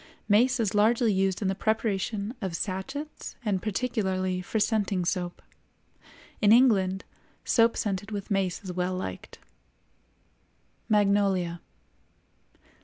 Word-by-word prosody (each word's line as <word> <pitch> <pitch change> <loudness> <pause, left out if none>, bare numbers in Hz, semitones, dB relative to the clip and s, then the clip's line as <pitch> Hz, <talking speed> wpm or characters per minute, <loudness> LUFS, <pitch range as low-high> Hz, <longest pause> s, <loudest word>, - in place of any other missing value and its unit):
Mace 240 +5 +4
is 215 -4 0
largely 220 +2 +3
used 190 +1 0
in - - +1
the 190 - +1
preparation 215 0 -1
of 190 -4 -3
sachets 215 - -5
and 195 -3 0
particularly 190 -4 -1
for 220 +4 -2
scenting 205 -4 +1
soap. 175 -1 -3 1.0
In 210 -1 +5
England, 200 -6 +4 0.4
soap 230 -1 +3
scented 205 0 -2
with 205 0 -5
mace 195 -2 0
is 185 -2 -5
well 180 +1 -1
liked. 185 - -6 1.5
MAGNOLIA. 200 -4 +2
200 Hz, 110 wpm, -27 LUFS, 185-220 Hz, 1.5 s, In